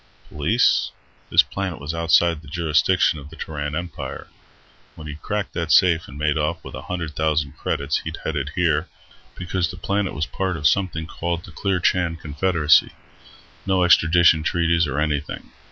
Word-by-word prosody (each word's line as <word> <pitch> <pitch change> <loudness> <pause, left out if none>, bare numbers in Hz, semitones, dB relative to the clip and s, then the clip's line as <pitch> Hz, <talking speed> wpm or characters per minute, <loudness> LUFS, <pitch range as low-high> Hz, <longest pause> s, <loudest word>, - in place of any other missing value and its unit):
Police? - - +2 0.4
This - - +6
planet 95 -4 -4
was 70 +3 -5
outside 85 -1 +2
the 75 - -15
jurisdiction 80 +1 +2
of 70 +1 -11
the 80 - -12
Terran 75 -2 -5
Empire. 85 -1 -6 0.7
When 75 - -10
he'd 75 +1 -8
cracked 105 -1 -3
that 85 -2 -2
safe 85 -3 +4
and 70 - -11
made 75 0 0
off 75 +3 -2
with - - -10
a - - -6
hundred 85 -4 -5
thousand 75 -2 0
credits, 70 -1 -1
he'd - - -6
headed 70 -2 -2
here, 85 -2 +1 0.5
because 90 -1 -2
the 90 - -8
planet 100 0 -2
was 75 +3 -1
part 95 0 -3
of 75 -2 +2
something 90 -4 0
called 85 +1 -4
the - - -12
Clearchan 90 -2 0
Confederacy. 75 0 +2 0.7
No 95 -1 +2
extradition 85 -2 +5
treaties 85 0 +1
or 70 +1 -2
anything. 75 -1 -3
80 Hz, 165 wpm, -22 LUFS, 75-90 Hz, 0.7 s, This